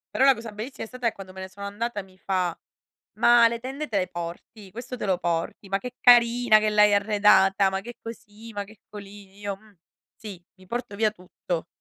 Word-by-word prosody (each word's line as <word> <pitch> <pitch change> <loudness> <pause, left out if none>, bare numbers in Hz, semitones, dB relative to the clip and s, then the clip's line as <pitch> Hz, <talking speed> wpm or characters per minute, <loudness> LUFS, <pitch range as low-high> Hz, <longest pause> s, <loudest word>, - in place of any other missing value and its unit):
Però 265 - +3
la 270 0 +7
cosa 225 -2 -9
bellissima 225 +4 -6
è - - -12
stata 250 -1 -3
è 230 - +1
quando 185 -1 -11
me 190 - -8
ne 190 - -7
sono 200 +1 -9
andata 210 +2 -3
mi 190 -1 -19
fa: 185 -3 -1 0.6
“Ma 240 -1 +7
le 235 0 -4
tende 270 +5 -5
te 210 - 0
le 185 - 0
porti? 175 +4 -8
Questo 245 +3 -7
te 240 - -5
lo 190 -2 +1
porti? 170 +3 -3
Ma 195 0 0
che 250 +3 -8
carina 240 -2 +6
che 215 - +1
l'hai 210 -1 +5
arredata, 200 -1 +4
ma 190 0 -3
che 240 +4 -9
così, 225 0 -11
ma 205 -1 -3
che 210 +2 -16
colì”, 200 -1 -12
io: 200 -1 -4
“Mh, 210 -1 -23 0.4
sì, 205 -5 -10 0.2
mi 185 0 -19
porto 240 -1 -4
via 215 0 +2
tutto, 180 -3 -6
205 Hz, 220 wpm, -25 LUFS, 195-230 Hz, 0.6 s, la